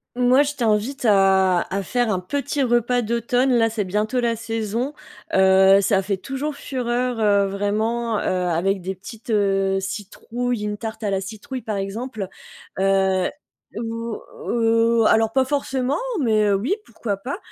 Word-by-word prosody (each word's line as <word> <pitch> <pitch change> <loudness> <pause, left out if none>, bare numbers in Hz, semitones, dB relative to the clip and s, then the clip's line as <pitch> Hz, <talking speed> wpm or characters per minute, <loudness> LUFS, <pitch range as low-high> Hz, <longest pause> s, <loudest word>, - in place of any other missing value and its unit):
Moi, 250 +3 +4
je 290 0 -3
t'invite 235 +2 0
à 190 -3 +4
à 195 0 -1
faire 240 +1 0
un 185 - 0
petit 280 +8 -2
repas 240 0 +2
d'automne, 240 +3 +1
là, 225 -1 +3
c'est 215 -3 -2
bientôt 210 +6 -1
la 235 -1 +1
saison. 225 +4 -3 0.4
Heu, 190 +1 +6
ça 195 -1 +2
fait 195 0 -2
toujours 275 +7 -4
fureur, 250 -2 -2
heu, 200 -1 +3
vraiment, 215 +3 -1
heu, - - -3 0.3
avec 190 +3 0
des 190 +2 -3
petites, 225 +5 -12
heu, 195 -2 +2
citrouilles, 215 +4 -4
une 210 0 -3
tarte 220 0 -6
à 205 - 0
la 195 0 0
citrouille, 230 +6 -7
par 215 -2 -3
exemple. 205 +1 -4 0.5
Heu, 190 -1 +2 0.5
ou 230 0 -4 0.3
ou 230 -1 +3
alors 220 0 +4
pas 265 +1 +2
forcément, 270 0 -1 0.2
mais, 220 -6 +2
heu, 200 - +3
oui, 245 - 0
pourquoi 220 -3 -4
pas? 255 - -5
225 Hz, 160 wpm, -22 LUFS, 195-245 Hz, 0.5 s, Heu